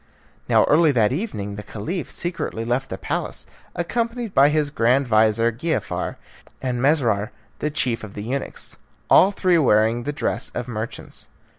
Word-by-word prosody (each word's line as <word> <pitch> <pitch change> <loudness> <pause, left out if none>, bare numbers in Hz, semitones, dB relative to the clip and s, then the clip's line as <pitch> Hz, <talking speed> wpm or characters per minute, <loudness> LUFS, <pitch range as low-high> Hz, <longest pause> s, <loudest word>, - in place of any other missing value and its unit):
Now - - +5
early 155 +1 +4
that 110 -3 +3
evening 105 - -4
the - - -4
Caliph 155 - -5
secretly 170 -10 -4
left 125 +3 -1
the - - -4
palace, - - -3 0.3
accompanied 230 +5 -2
by 140 +2 +6
his 150 -1 +1
grand 125 +1 +2
vizir, 110 +1 +3
Giafar, 155 +8 -2 0.4
and 125 -2 -2
Mesrour, 120 -7 +2 0.4
chief 120 -6 0
of 105 -2 -9
the 105 - -5
eunuchs, 135 +5 -4 0.3
all 190 - +8
three 185 -3 +2
wearing 115 -3 +3
the 145 - -3
dresses 145 - -2
of 120 0 -3
merchants. 110 -1 -6
125 Hz, 150 wpm, -22 LUFS, 110-160 Hz, 0.4 s, all